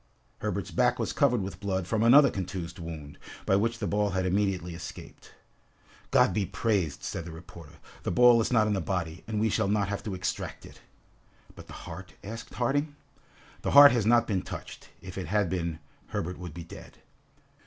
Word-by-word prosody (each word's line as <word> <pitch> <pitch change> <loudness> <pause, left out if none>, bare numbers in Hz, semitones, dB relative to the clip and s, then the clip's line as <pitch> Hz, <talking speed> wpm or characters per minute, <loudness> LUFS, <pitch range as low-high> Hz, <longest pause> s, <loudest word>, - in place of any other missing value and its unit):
Herberts - - -3
back - - +2
was - - -2
covered 125 -7 +2
with 95 - -6
blood 95 -2 -2
from 110 +3 -1
another 135 +4 +7
contused 90 -1 -5
wound, 80 -4 -8 0.3
by 95 - +3
which 115 +3 +1
the - - -3
ball 105 0 +1
had 95 -1 -1
immediately 95 -2 0
escaped. 85 - -10 0.8
"God - - +4
be 105 - +1
praised!" 95 -4 -1
said - - -4
the 85 - -8
reporter, 80 -2 -12 0.3
"the - - -3
ball 120 -1 +6
is 110 - -1
not 115 -3 +4
in 105 - +1
the 95 - -1
body, 85 -1 -3
and 110 -1 -2
we 110 - +2
shall 110 0 +1
not 100 -1 +1
have 100 - -3
to 100 -3 -3
extract 90 +1 -4
it." - - -15 0.7
"But - - -12
the - - -11
heart?" 90 +3 -9
asked 115 +3 -8
Harding. 145 +4 0 0.7
"The - - -2
heart 145 0 +11
has 115 -4 +1
not 120 0 +5
been 100 -5 -1
touched; - - -9
if 95 +1 -7
it 90 - -5
had 105 -1 +1
been, 85 -3 -2 0.3
Herbert 90 +2 -4
would 90 -3 -8
be 85 - -6
dead!" 85 - -12
95 Hz, 195 wpm, -28 LUFS, 90-110 Hz, 0.8 s, heart